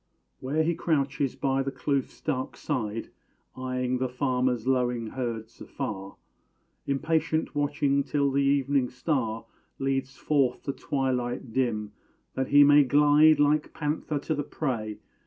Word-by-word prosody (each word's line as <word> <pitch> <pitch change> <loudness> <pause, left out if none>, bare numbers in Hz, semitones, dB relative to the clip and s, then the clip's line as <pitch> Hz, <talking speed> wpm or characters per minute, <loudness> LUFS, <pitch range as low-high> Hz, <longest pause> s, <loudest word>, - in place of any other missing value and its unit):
where 145 +5 0
he 170 +2 +1
crouches 140 -5 0
by 135 0 0
the 135 - -2
Kloof's 135 0 -2
dark 130 -4 -3
side, 115 -6 -3 0.4
Eyeing 130 0 -2
the 130 0 -1
farmer's 125 -2 0
lowing 125 -3 +1
herds, 115 -3 -5
afar; 95 -2 -5 0.7
Impatient 155 +3 0
watching 145 -1 +1
till 140 -1 0
the 140 +1 +2
evening 140 -2 +2
star 125 -4 -2 0.3
Leads 135 0 -2
forth 135 -1 +1
the 140 - -2
twilight 125 -4 -2
dim, 110 -5 0 0.4
that 130 0 -1
he 145 0 +7
may 145 0 +7
glide 150 +3 +5
Like 150 +1 +2
panther 150 0 -2
to 145 +3 -2
the 145 - -1
prey. 115 -8 -3
135 Hz, 135 wpm, -27 LUFS, 125-145 Hz, 0.7 s, he